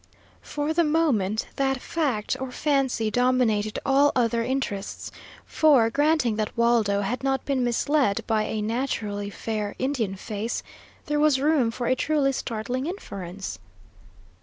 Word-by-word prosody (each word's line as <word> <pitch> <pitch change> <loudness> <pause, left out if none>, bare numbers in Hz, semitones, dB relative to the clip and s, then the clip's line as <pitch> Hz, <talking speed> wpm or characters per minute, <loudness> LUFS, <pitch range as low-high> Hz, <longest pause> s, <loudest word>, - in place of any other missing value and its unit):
For 295 +1 -2
the 340 +1 +3
moment 270 - +1
that 270 -1 +1
fact 260 -8 -1
or 265 -1 -4
fancy 265 -6 0
dominated 235 -3 +1
all 280 +2 +4
other 235 -2 +2
interests, 240 -6 -3 0.3
for, 270 -8 +4
granting 290 -5 +2
that 215 +1 -3
Waldo 230 -4 +3
had 220 +6 -2
not 270 -1 0
been 270 -3 0
misled 245 -1 +1
by 215 -1 +1
a 215 -1 -2
naturally 215 -3 -2
fair 210 0 -4
Indian 255 -7 -1
face, 210 +4 -4 0.4
there 295 0 0
was 295 -3 +4
room 285 -4 +3
for 240 +1 -4
a 255 - +3
truly 280 +1 +1
startling 250 +2 -3
inference. 195 - -6
245 Hz, 135 wpm, -25 LUFS, 215-280 Hz, 0.4 s, all